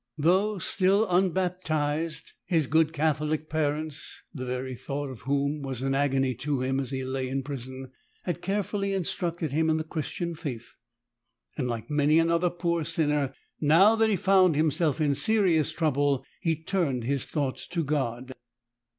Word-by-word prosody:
Though 190 Hz, +7 st, +2 dB
still 195 Hz, +4 st, +2 dB
unbaptized, 175 Hz, -4 st, 0 dB
his 160 Hz, -5 st, +1 dB
164 160 Hz, +4 st, +3 dB
good 160 Hz, -1 st, +3 dB
Catholic 155 Hz, 0 st, 0 dB
parents 155 Hz, -1 st, -2 dB
— -, -, -37 dB
the 130 Hz, -3 st, -5 dB
very 130 Hz, +1 st, -3 dB
thought 140 Hz, +2 st, -4 dB
of 125 Hz, -, -9 dB
whom 140 Hz, +1 st, 0 dB
was 135 Hz, -2 st, -4 dB
an 135 Hz, 0 st, 0 dB
agony 135 Hz, -2 st, +1 dB
to 145 Hz, -2 st, -1 dB
him 135 Hz, +1 st, 0 dB
as 135 Hz, -3 st, -3 dB
he 130 Hz, -1 st, -3 dB
lay 130 Hz, 0 st, -2 dB
in 135 Hz, +1 st, -2 dB
prison 130 Hz, -1 st, -7 dB, 0.2 s
— -, -, -38 dB
had 175 Hz, -5 st, -3 dB
carefully 200 Hz, 0 st, -1 dB
instructed 170 Hz, -3 st, -2 dB
him 160 Hz, +2 st, +2 dB
in 160 Hz, -, +2 dB
the 160 Hz, -, -2 dB
Christian 165 Hz, +2 st, -4 dB
Faith, 140 Hz, -8 st, -6 dB, 0.8 s
and, 125 Hz, -, -2 dB
like 120 Hz, +3 st, -4 dB
many 150 Hz, +1 st, +3 dB
another 170 Hz, +2 st, +3 dB
poor 170 Hz, -1 st, -1 dB
sinner, 150 Hz, -4 st, 0 dB, 0.2 s
now 170 Hz, +9 st, +6 dB
that 225 Hz, 0 st, +3 dB
he 210 Hz, -, +3 dB
found 185 Hz, -2 st, +4 dB
himself 155 Hz, 0 st, +1 dB
in 150 Hz, -2 st, +2 dB
serious 185 Hz, -3 st, +2 dB
trouble 145 Hz, -4 st, +1 dB
he 165 Hz, -3 st, +1 dB
turned 160 Hz, -6 st, -1 dB
his 135 Hz, +2 st, 0 dB
thoughts 140 Hz, -4 st, -2 dB
to 170 Hz, -2 st, -2 dB
God. 130 Hz, -4 st, -2 dB
155 Hz, 170 wpm, -27 LUFS, 135-170 Hz, 0.8 s, now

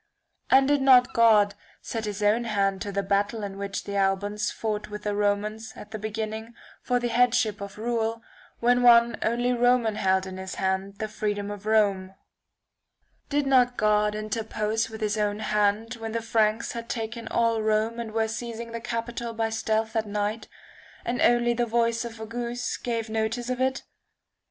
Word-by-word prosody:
And 270 Hz, 0 st, +6 dB
did 290 Hz, -1 st, +3 dB
not 255 Hz, -2 st, +6 dB
God 215 Hz, -3 st, +5 dB, 0.3 s
set 225 Hz, -2 st, -4 dB
his 210 Hz, 0 st, -4 dB
own 220 Hz, +3 st, +3 dB
hand 195 Hz, -3 st, 0 dB
to 205 Hz, -, -3 dB
the 200 Hz, 0 st, -1 dB
battle 205 Hz, +3 st, 0 dB
in 200 Hz, -1 st, -5 dB
which 200 Hz, -1 st, -4 dB
the 200 Hz, -, -5 dB
Albans 200 Hz, +2 st, 0 dB
fought 215 Hz, -1 st, -3 dB
with 210 Hz, 0 st, -7 dB
the 210 Hz, -, -1 dB
Romans, 210 Hz, +2 st, -1 dB
at 210 Hz, -, -11 dB
the 215 Hz, -, -5 dB
beginning, 220 Hz, +2 st, -5 dB, 0.3 s
for 245 Hz, -1 st, +1 dB
the 240 Hz, 0 st, -2 dB
headship 235 Hz, -3 st, +2 dB
of 200 Hz, 0 st, -7 dB
rule, 230 Hz, 0 st, -2 dB, 0.4 s
when 245 Hz, +1 st, +3 dB
one 235 Hz, -1 st, +6 dB
only 240 Hz, +2 st, +1 dB
Roman 240 Hz, -3 st, +2 dB
held 190 Hz, 0 st, +2 dB
in 190 Hz, 0 st, -7 dB
his 190 Hz, 0 st, -6 dB
hands 190 Hz, +1 st, -2 dB
the -, -, -5 dB
[1603 215 Hz, -, -12 dB
freedom 205 Hz, -1 st, -1 dB
of 205 Hz, 0 st, -8 dB
Rome: 200 Hz, -3 st, +2 dB, 1.1 s
Did 290 Hz, 0 st, +1 dB
not 250 Hz, -2 st, +3 dB
God 210 Hz, 0 st, +2 dB
interpose 215 Hz, +1 st, -2 dB
with 220 Hz, 0 st, -9 dB
his 215 Hz, 0 st, 0 dB
own 205 Hz, 0 st, 0 dB
hand 210 Hz, +2 st, 0 dB
when 225 Hz, -1 st, -6 dB
the 230 Hz, -1 st, -2 dB
Franks 220 Hz, 0 st, +1 dB
had 230 Hz, 0 st, -7 dB
taken 230 Hz, 0 st, -4 dB
all 230 Hz, -1 st, +1 dB
Rome 220 Hz, +2 st, 0 dB
and 230 Hz, -2 st, -5 dB
were 220 Hz, 0 st, 0 dB
seizing 230 Hz, +1 st, -6 dB
the 230 Hz, 0 st, -5 dB
capitol 235 Hz, 0 st, -4 dB
by 225 Hz, 0 st, -1 dB
stealth 220 Hz, 0 st, -1 dB
at 220 Hz, -1 st, 0 dB
night, 210 Hz, +2 st, -2 dB, 0.6 s
and 245 Hz, +1 st, -1 dB
only 240 Hz, 0 st, +4 dB
the 240 Hz, 0 st, 0 dB
voice 230 Hz, 0 st, +1 dB
of 230 Hz, -1 st, -8 dB
a 220 Hz, -, -5 dB
goose 240 Hz, +2 st, -3 dB
gave 230 Hz, -2 st, -3 dB
notice 225 Hz, +3 st, -2 dB
of 255 Hz, 0 st, -2 dB
it 260 Hz, 0 st, 0 dB
220 Hz, 185 wpm, -26 LUFS, 210-235 Hz, 1.1 s, And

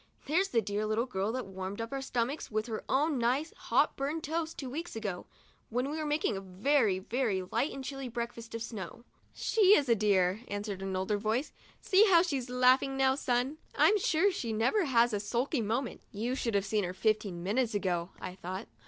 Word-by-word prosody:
"There's 350 Hz, +7 st, +2 dB
the 230 Hz, -, +1 dB
dear 205 Hz, +2 st, -2 dB
little 220 Hz, +3 st, +1 dB
girl 200 Hz, -3 st, -2 dB
that 255 Hz, -1 st, -3 dB
warmed 190 Hz, +1 st, -6 dB
up 230 Hz, 0 st, -4 dB
our 270 Hz, -, -2 dB
stomachs 260 Hz, +2 st, -2 dB
with 215 Hz, 0 st, -1 dB
her 225 Hz, -2 st, -5 dB
own 290 Hz, 0 st, +2 dB
nice, 260 Hz, +7 st, 0 dB
hot -, -, +1 dB
buttered 295 Hz, +4 st, -2 dB
toast 325 Hz, +2 st, -3 dB
two 270 Hz, -, -5 dB
weeks 315 Hz, +5 st, -5 dB
ago, 205 Hz, -5 st, -4 dB, 0.4 s
when 250 Hz, +4 st, -1 dB
we 315 Hz, -, -3 dB
were 310 Hz, -, -2 dB
making 295 Hz, -7 st, 0 dB
a 195 Hz, -, -4 dB
very, 200 Hz, +3 st, +2 dB
very 205 Hz, -1 st, -1 dB
light 260 Hz, +10 st, -1 dB
and 270 Hz, -, -6 dB
chilly 270 Hz, -1 st, -5 dB
breakfast 235 Hz, -1 st, -5 dB
of 230 Hz, -, -3 dB
snow." 220 Hz, 0 st, -7 dB, 0.2 s
' -, -, -36 dB
She 415 Hz, -2 st, +5 dB
is 280 Hz, -, 0 dB
a 235 Hz, -, +5 dB
dear 200 Hz, -2 st, +2 dB
!" -, -, -28 dB
answered 205 Hz, -1 st, -4 dB
an 195 Hz, -1 st, -3 dB
older 190 Hz, +3 st, 0 dB
voice; 225 Hz, +7 st, -1 dB, 0.2 s
" -, -, -29 dB
see 400 Hz, +3 st, +6 dB
how 340 Hz, -2 st, +7 dB
she's 275 Hz, -8 st, -2 dB
laughing, 255 Hz, +2 st, +3 dB, 0.2 s
son! 265 Hz, +3 st, -1 dB, 0.2 s
I'm 420 Hz, 0 st, +5 dB
sure 365 Hz, +2 st, +3 dB
she 240 Hz, -11 st, -3 dB
never 245 Hz, -, +2 dB
has 240 Hz, -4 st, +3 dB
a 205 Hz, -, 0 dB
sulky 240 Hz, +6 st, -1 dB
moment." 230 Hz, +4 st, -2 dB
* -, -, -39 dB
You 245 Hz, +3 st, 0 dB
should 235 Hz, -4 st, -1 dB
have 200 Hz, 0 st, +2 dB
seen 210 Hz, +1 st, 0 dB
her 180 Hz, 0 st, -4 dB
fifteen 205 Hz, -5 st, 0 dB
minutes 225 Hz, +4 st, 0 dB
ago," 180 Hz, -3 st, -1 dB
I 180 Hz, -, -6 dB
thought. 185 Hz, +1 st, -6 dB
235 Hz, 215 wpm, -31 LUFS, 205-275 Hz, 0.4 s, how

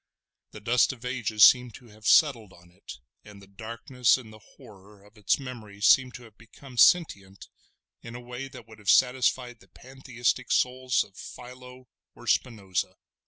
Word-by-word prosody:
The -, -, -12 dB
dust 120 Hz, +5 st, +2 dB
of 125 Hz, -1 st, -14 dB
ages 120 Hz, -4 st, 0 dB
seemed 125 Hz, 0 st, +5 dB
to 120 Hz, -3 st, -16 dB
have 105 Hz, 0 st, -10 dB
settled 115 Hz, -10 st, +3 dB
on 85 Hz, 0 st, -20 dB
it, 90 Hz, -6 st, -12 dB, 0.3 s
and 105 Hz, -1 st, -15 dB
the 100 Hz, -, -16 dB
darkness 115 Hz, +5 st, -1 dB
and 110 Hz, -4 st, -13 dB
the 110 Hz, -, -15 dB, 0.2 s
horror 100 Hz, 0 st, -17 dB
of 105 Hz, +1 st, -22 dB
its 105 Hz, -3 st, 0 dB
memories 110 Hz, -7 st, -7 dB
seem 130 Hz, -1 st, +4 dB
to 125 Hz, -, -11 dB
have 110 Hz, -3 st, -19 dB
become 125 Hz, +3 st, -16 dB
sentient 100 Hz, -, +2 dB, 0.5 s
in 115 Hz, 0 st, -10 dB
a -, -, -7 dB
way 125 Hz, +2 st, -8 dB
that -, -, -14 dB
would 110 Hz, -1 st, -16 dB
have 105 Hz, -2 st, -5 dB
satisfied 125 Hz, -1 st, +1 dB
the -, -, -22 dB
Pantheistic 130 Hz, -2 st, -4 dB
souls 130 Hz, 0 st, 0 dB
of 100 Hz, -, -21 dB
Philo 125 Hz, +2 st, -12 dB, 0.3 s
or -, -, -15 dB
Spinoza. 100 Hz, -7 st, -2 dB
120 Hz, 170 wpm, -26 LUFS, 105-125 Hz, 0.5 s, seemed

